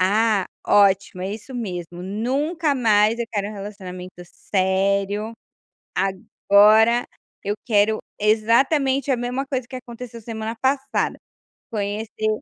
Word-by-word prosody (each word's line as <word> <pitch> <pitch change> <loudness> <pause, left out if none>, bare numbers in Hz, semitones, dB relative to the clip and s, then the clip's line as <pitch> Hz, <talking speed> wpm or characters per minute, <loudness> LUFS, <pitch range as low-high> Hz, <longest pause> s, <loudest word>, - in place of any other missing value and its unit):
"Ah, 205 +1 +3 0.2
ótimo, 195 -2 +3
é 190 +2 -3
isso 225 +5 -9
mesmo, 180 -6 -5
nunca 280 - -1
mais 220 -3 +3
eu 235 - -1
quero 200 -2 -1
relacionamento 190 -3 -8
sério. 200 +3 0 0.6
Agora 210 +4 +4 0.4
eu 205 +1 -1
quero 215 -1 +2 0.2
exatamente 265 +6 +2
a 255 - +2
mesma 250 +3 -2
coisa 260 -3 -3
que 265 - -8
aconteceu 240 -1 -9
semana 225 0 -5
passada, 265 +1 0 0.5
conhecer 215 +1 -3
215 Hz, 110 wpm, -22 LUFS, 200-245 Hz, 0.6 s, Agora